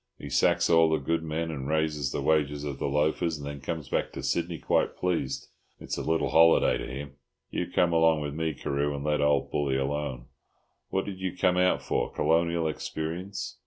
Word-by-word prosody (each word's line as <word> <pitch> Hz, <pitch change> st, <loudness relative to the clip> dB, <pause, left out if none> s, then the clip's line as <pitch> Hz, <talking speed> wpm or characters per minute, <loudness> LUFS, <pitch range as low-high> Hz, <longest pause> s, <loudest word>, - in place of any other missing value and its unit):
He -, -, -8 dB
sacks -, -, +3 dB
all 80 Hz, -1 st, +5 dB
the 80 Hz, -, +2 dB
good 80 Hz, +4 st, -1 dB
men 80 Hz, +1 st, -3 dB
and 70 Hz, -3 st, -5 dB
raises 75 Hz, -3 st, 0 dB
the -, -, -3 dB
wages 75 Hz, -2 st, +1 dB
of 70 Hz, -2 st, -5 dB
the -, -, -1 dB
loafers, 80 Hz, +3 st, +1 dB
and 70 Hz, -, -8 dB
then 70 Hz, -1 st, -6 dB
comes 80 Hz, +2 st, -4 dB
back -, -, -1 dB
to -, -, -6 dB
Sydney 85 Hz, 0 st, -1 dB
quite -, -, 0 dB
pleased; 85 Hz, -7 st, -2 dB, 0.3 s
it's -, -, -4 dB
a -, -, -3 dB
little 80 Hz, +1 st, 0 dB
holiday 80 Hz, 0 st, +5 dB
to -, -, -5 dB
him. 70 Hz, +1 st, -7 dB, 0.3 s
You 90 Hz, -, -2 dB
come 90 Hz, -1 st, +2 dB
along 80 Hz, -1 st, +4 dB
with 75 Hz, -1 st, -4 dB
me, 80 Hz, -1 st, -2 dB
Carew, 70 Hz, +2 st, -1 dB
and 70 Hz, -, -5 dB
let 75 Hz, -1 st, +1 dB
old 75 Hz, -1 st, +2 dB
Bully 70 Hz, -2 st, 0 dB
alone. 70 Hz, -2 st, -2 dB, 0.6 s
What 95 Hz, -, -1 dB
did 95 Hz, -2 st, -6 dB
you 95 Hz, -1 st, -4 dB
come 90 Hz, 0 st, +2 dB
out 90 Hz, 0 st, +2 dB
for? -, -, -1 dB
Colonial 85 Hz, 0 st, +1 dB
experience?" 85 Hz, +5 st, -4 dB
80 Hz, 200 wpm, -28 LUFS, 70-85 Hz, 0.6 s, all